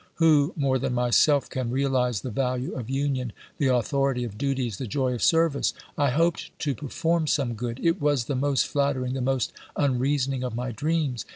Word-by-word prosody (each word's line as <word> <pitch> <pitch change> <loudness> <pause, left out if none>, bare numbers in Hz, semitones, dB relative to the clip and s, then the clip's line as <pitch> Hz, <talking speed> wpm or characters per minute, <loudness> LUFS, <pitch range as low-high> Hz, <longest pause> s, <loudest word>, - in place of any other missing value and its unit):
Who, 155 -2 +4
more 135 -4 +1
than 125 - -1
myself, 125 +3 +3
can 130 -2 -3
realise 125 -4 +1
the 130 - -5
value 130 -1 -1
of 125 -3 -6
union, 135 -4 -1 0.3
the 140 - +2
authority 130 +1 +1
of 115 -4 -6
duties, 130 -4 -2
the 130 - -4
joy 130 +2 0
of 120 - -4
service! 165 -3 +2 0.2
I 145 -1 +2
hoped 165 +6 +1
to 145 -3 0
perform 160 +4 -1
some 135 -5 +1
good^ 115 +1 -4
— - - -10
it 165 +1 +2
was 145 -5 +2
the 140 - -2
most 140 +1 +1
flattering, 140 -3 0
the 135 - -2
most 130 0 0 0.2
unreasoning 135 -1 +1
of 125 -2 -3
my 125 +1 -3
dreams. 145 0 -1
135 Hz, 190 wpm, -26 LUFS, 125-145 Hz, 0.3 s, Who